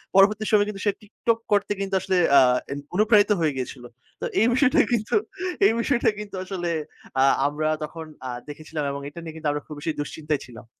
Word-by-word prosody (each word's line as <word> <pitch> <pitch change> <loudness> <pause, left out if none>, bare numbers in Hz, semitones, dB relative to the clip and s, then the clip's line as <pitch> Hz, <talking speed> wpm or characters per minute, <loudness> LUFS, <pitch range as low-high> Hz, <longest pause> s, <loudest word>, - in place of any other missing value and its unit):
পরবর্তী 210 +2 +5
সময়ে 205 -1 +4
কিন্তু 195 -2 -6
সে 205 - +4
TikTok 225 +2 -1
করতে 205 0 +2
কিন্তু 195 0 -3
আসলে 190 0 0 0.2
আ - - +10 0.3
এন 140 - -3 0.2
অনুপ্রাণিত 210 +1 +4
হয়ে 155 -3 +2
গিয়েছিল। 125 0 -5 0.4
তো - - -1 0.2
এই 225 - +5
বিষয়টা 260 +1 +4
কিন্তু, 225 -2 0 0.5
এই 200 - +6
বিষয়টা 240 +1 +2
কিন্তু 210 -2 -7
আসলে 185 -2 -3 0.5
আ - - +6 0.2
আমরা 155 +2 -1
তখন 160 +1 -6 0.2
আ - - -4 0.2
দেখেছিলাম 155 +1 -5
এবং 140 0 -5
এটা 145 - -10
নিয়ে 160 -1 -8
কিন্তু 160 -1 -4
আমরা 145 0 -3
খুব 150 - -8
বেশি 160 +2 -2
দুশ্চিন্তায় 150 0 -3
ছিলাম। 115 -3 -12
185 Hz, 195 wpm, -24 LUFS, 150-210 Hz, 0.5 s, আ